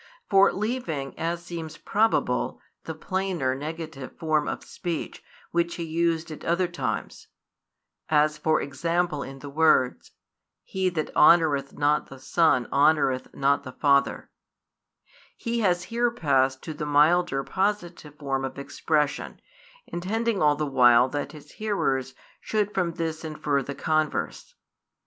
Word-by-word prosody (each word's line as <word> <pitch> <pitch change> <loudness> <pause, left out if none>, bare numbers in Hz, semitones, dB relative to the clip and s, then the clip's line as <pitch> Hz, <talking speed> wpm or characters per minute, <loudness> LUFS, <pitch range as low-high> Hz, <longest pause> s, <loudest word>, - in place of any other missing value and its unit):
For 195 0 +6
leaving, 195 - -3
as 170 +1 -2
seems 165 -3 -7
probable, 220 +2 0 0.3
the - - -5
plainer 185 -9 -1
[negative] 155 -1 -7
form 155 -3 0
of - - -4
speech, 170 -3 -5 0.3
which 170 0 0
He 170 - -4
used 165 0 -1
at 155 - -9
other 175 +2 +1
times, 175 0 -4 0.8
as 150 0 +3
for 155 0 +1
example 165 +2 -1
in 135 0 -7
the 145 +1 -9
words: 155 -4 +2 0.5
He 190 -1 -1
that 160 -3 -4
honoureth 150 -4 +4
not 145 +1 +2
the 135 - -11
Son 130 -2 +2
honoureth 140 -3 +2
not 140 +1 +2
the 130 - -8
Father, 140 -2 +1 1.1
He 235 -1 -2
has 180 -5 +1
here 235 +4 0
passed 135 - +1
to 160 - -5
the 150 0 -5
milder 150 0 +3
[positive] 180 -6 -2
form 135 -2 -2
of 135 0 -5
expression, 150 +1 -1 0.5
intending 215 +4 -2
all 150 -1 +4
the 150 +1 -2
while 125 -2 +5
that 145 +2 -4
His 150 -1 -13
hearers 135 -12 -1 0.2
should 210 -1 -1
from 175 -3 0
this 165 -2 -4
infer 150 -3 -1
the 140 +2 -6
converse. 155 +1 -2
155 Hz, 135 wpm, -26 LUFS, 140-175 Hz, 1.1 s, For